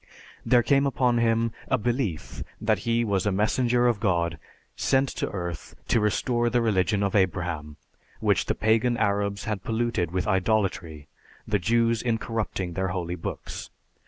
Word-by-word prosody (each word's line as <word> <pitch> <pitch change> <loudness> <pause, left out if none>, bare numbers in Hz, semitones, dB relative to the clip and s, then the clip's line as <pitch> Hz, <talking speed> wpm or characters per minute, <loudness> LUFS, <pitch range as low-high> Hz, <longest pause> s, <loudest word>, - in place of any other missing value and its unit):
There 120 -1 +4
came 140 +1 +3
upon 125 -3 +2
him 115 0 +2 0.2
a 130 - +2
belief 115 - -2 0.2
that - - +1
he 115 0 +2
was 100 -2 0
a - - +2
messenger 120 +5 +2
of 120 -4 +2
God 85 -5 0 0.4
sent 135 0 +1
on - - 0
earth 85 -5 -6
to 115 - +4
restore 120 +3 +1
the 120 +1 +2
religion 100 -1 +1
of 100 - 0
Abraham, 85 -6 -1 0.4
which - - +1
the - - 0
pagan 115 +3 +2
Arabs 100 -1 0
had 105 -3 -3
polluted 115 -6 -1
with 90 +1 -2
idolatry, 95 -7 0 0.4
the 105 -2 +1
Jews 115 +4 +2
in 115 -2 0
corrupting 105 -6 -3
their 95 +2 -1
holy 90 -1 -3
books. 90 - -6
105 Hz, 160 wpm, -26 LUFS, 95-120 Hz, 0.4 s, There